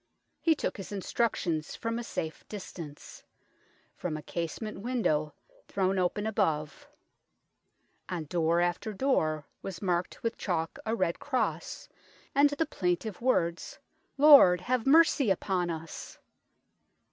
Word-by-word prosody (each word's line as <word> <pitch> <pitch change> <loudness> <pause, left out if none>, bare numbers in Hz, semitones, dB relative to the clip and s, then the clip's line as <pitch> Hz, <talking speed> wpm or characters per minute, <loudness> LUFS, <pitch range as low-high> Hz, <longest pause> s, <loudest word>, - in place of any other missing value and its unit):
He 325 -1 +3
took - - -3
his 195 - -8
instructions 185 -5 -1
from 230 +1 -3
a - - -4
safe 160 -8 -5
distance 170 -7 -9 0.7
from 160 -4 -3
a 150 - -9
casement 175 +6 -4
window 195 -10 0 0.3
thrown 190 0 0
open 185 +3 0
above. 160 -9 -1 1.2
On 175 -4 -3
door 170 +2 +1
after 175 +5 -1
door 155 - +1 0.2
was 190 -4 -6
marked 180 -2 -2
with 230 - -2
chalk 165 -4 -2
a 225 - +1
red 185 -5 0
cross, 260 -3 -2 0.5
and 285 +1 +5
the 290 +3 0
plaintive 180 - -2
words, 170 -9 0 0.2
" - - -42
Lord, 275 - +8
have 250 +4 -1
mercy 295 -4 +5
upon 185 -2 0
us 165 -1 -7
185 Hz, 125 wpm, -29 LUFS, 170-230 Hz, 1.2 s, Lord